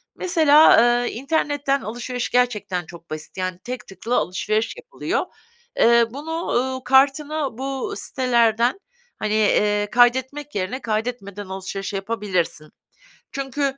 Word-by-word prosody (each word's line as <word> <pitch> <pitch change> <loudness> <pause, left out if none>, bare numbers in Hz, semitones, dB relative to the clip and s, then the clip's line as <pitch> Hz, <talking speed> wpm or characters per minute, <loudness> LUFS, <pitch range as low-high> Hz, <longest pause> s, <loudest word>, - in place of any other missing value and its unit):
mesela, 315 -4 +5 0.3
eee, - - -2
internetten 280 +1 -1
alışveriş 240 +2 -4
gerçekten 210 -8 0
çok 170 +1 -13
basit. 155 +4 -8
Yani 185 -1 -3
tek 250 +1 -6
tıkla 195 +6 -3
alışveriş 215 +5 -1
yapılıyor. 485 0 -3 0.5
Eee, 235 0 +5
bunu, 320 +5 -5
ııı, 260 +1 -1
kartına 280 0 +2
bu 270 0 -3
sitelerden, 240 - +1 0.4
hani, 215 0 -1
eee, 210 -1 +2
kaydetmek 260 +4 +2
yerine 200 +7 -2
kaydetmeden 215 -3 -3
alışveriş 190 +1 -5
yapabilirsin. 195 -6 -2 0.6
Çünkü 275 0 -2
240 Hz, 115 wpm, -22 LUFS, 205-275 Hz, 0.6 s, mesela